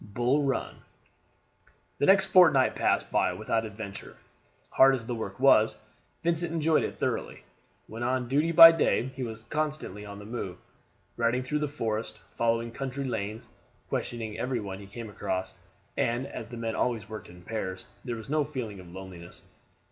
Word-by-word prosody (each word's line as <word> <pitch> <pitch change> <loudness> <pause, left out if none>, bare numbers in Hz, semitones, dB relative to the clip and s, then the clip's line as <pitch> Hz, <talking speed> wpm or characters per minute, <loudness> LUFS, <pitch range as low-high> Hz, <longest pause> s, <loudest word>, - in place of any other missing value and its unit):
BULL 125 +4 +2
RUN. 135 -2 -2 1.2
The 145 - +2
next 195 0 +6
fortnight 160 -9 +6
passed - - +1
by - - +2
without 115 0 -1
adventure. 100 -1 -8 0.5
Hard 135 0 +6
as 120 -3 -6
the 120 - -3
work 110 -3 -5
was, 115 -5 +5 0.5
Vincent 170 0 +1
enjoyed 160 -1 +2
it - - -4
thoroughly. - - -3 0.4
When 115 +2 -8
on 125 0 0
duty 150 +6 +2
by 165 0 +11
day 135 -5 +1
he - - -6
was 110 -2 -5
constantly 150 -7 -3
on 100 -1 -8
the 105 - -10
move, 105 -5 -5 0.6
riding 120 +2 +1
through 150 +4 -1
the 150 - 0
forest, 115 -6 -3
following 115 0 0
country 135 +2 -4
lanes, 110 -4 -4 0.4
questioning 110 -3 -3
every 125 -1 -1
one 100 -2 -6
he 100 - -11
came 115 +3 -8
across; 95 -2 -3 0.4
and 120 +3 0
as 115 - -7
the 120 +2 -8
men 115 -1 -2
always 115 -3 -1
worked 110 -4 -8
in 90 0 -14
pairs, 95 -3 -4 0.2
there 120 -2 -3
was 110 -1 -9
no 150 +1 +1
feeling 125 -9 -5
of 90 -2 -12
loneliness. 90 -2 -10
115 Hz, 170 wpm, -28 LUFS, 105-135 Hz, 1.2 s, by